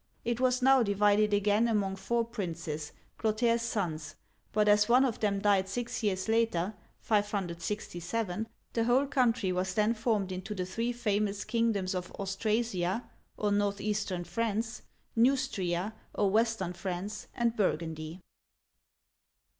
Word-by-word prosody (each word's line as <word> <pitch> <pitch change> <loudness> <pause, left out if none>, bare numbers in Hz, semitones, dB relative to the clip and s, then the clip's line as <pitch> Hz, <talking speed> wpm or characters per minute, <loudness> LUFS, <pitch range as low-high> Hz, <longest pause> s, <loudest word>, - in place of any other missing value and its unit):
It 235 0 0
was 255 0 +2
now 265 0 +6
divided 210 0 +3
again 205 +2 +3
among 200 -4 +1
four 235 +4 0
princes, 165 -9 -4 0.3
Clotaire' 225 +2 +2
s 230 0 0
sons, 160 -9 -2 0.4
but 210 0 +2
as 210 +1 +5
one 255 +3 +6
of 240 -4 -2
them 205 -2 +1
died 195 -1 +2
six 240 +4 -3
years 190 -3 0
later 220 -4 +1 0.3
(567), 205 0 -2 0.3
the 230 -1 +1
whole 250 +4 +4
country 245 -8 +2
was 185 0 -1
then 215 +1 +3
formed 215 -4 0
into 185 +3 -5
the 185 -2 -2
three 230 +6 -2
famous 210 -3 -1
kingdoms 225 -6 +1
of 180 -1 -4
Austra'sia, 200 0 -1 0.3
or 210 -1 0
Northeastern 205 -2 0
France, 225 +5 -2 0.3
Neus'tria, 220 -7 +1 0.2
or 200 -2 +2
West 225 -1 +2
ern 175 -1 -3
France, 190 +3 -5
and 235 -1 +1
Burgundy. 160 -3 -2
210 Hz, 135 wpm, -30 LUFS, 185-230 Hz, 0.4 s, now